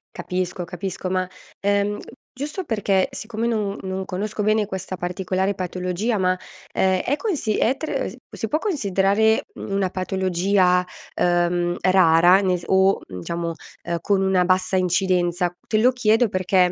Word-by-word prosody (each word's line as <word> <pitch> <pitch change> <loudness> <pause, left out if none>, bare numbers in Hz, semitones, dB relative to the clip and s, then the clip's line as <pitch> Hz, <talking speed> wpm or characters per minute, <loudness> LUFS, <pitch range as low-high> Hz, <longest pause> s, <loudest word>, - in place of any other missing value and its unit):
Capisco, 180 -1 -3
capisco, 185 +2 -5
ma, 185 0 0 0.3
ehm, 200 +1 +1 0.4
giusto 295 +8 -4
perché 200 - +1
siccome 220 +1 -4
non 210 -3 -1
non 190 0 -3
conosco 205 +4 -3
bene 215 0 +2
questa 190 -1 -5
particolare 185 +2 -1
patologia 185 +4 -2
ma, 185 -1 +1 0.4
ehm, 190 -1 +2
è 280 - 0
consi 300 - -1
è 255 - +2
tr 315 - -2
s - - -11
può - - -12
si - - -2
può 305 - +2
considerare, 220 - +2
mhmm, - - -8
una 195 -1 +1
patologia, 185 0 +1 0.3
uhm, 175 0 +1
rara 180 0 +5
ne 185 -2 +1
s 175 - -11
o, 190 +1 +4
mhmm, 90 -1 -7
diciamo, 170 - -3 0.3
ehm, 170 0 -2
con 200 -2 +1
una 190 -1 +3
bassa 185 +1 +1
incidenza? 180 -1 +1
Te 215 - 0
lo 240 +4 +5
chiedo 240 -1 +3
perché, 185 -1 -1
190 Hz, 160 wpm, -22 LUFS, 180-210 Hz, 0.4 s, rara